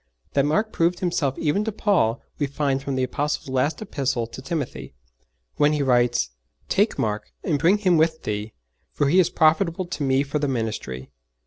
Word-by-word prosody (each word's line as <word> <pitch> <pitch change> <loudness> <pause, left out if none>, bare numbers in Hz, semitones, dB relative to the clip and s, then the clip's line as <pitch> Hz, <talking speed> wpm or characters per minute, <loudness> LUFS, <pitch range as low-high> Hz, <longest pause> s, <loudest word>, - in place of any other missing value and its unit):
That 140 0 +3
Mark 210 +8 +1
proved 170 +1 +2
himself 155 -7 0
even 165 +7 +1
to 220 - -2
Paul 180 - +1 0.2
we 145 - +1
find 140 -1 -1
from 140 -1 -3
the 130 - 0
Apostle's 145 +2 -2
last 145 +8 0
Epistle 135 - -1
to 115 +3 -10
Timothy, 140 0 -5 0.6
when 145 +1 +4
he 150 -1 +1
writes: 120 - +2 0.4
'_Take - - +2
Mark, 105 -1 -2
and 150 -5 0
bring 175 +8 +4
him 185 -5 +3
with 160 0 +1
thee: 105 +1 -3 0.4
for 145 - +1
he 180 +5 +5
is 175 -2 +4
profitable 170 +2 +2
to 175 -3 -6
me 135 0 +2
for 145 +2 -2
the 145 - 0
ministry. 110 - -3
145 Hz, 185 wpm, -24 LUFS, 130-170 Hz, 0.6 s, he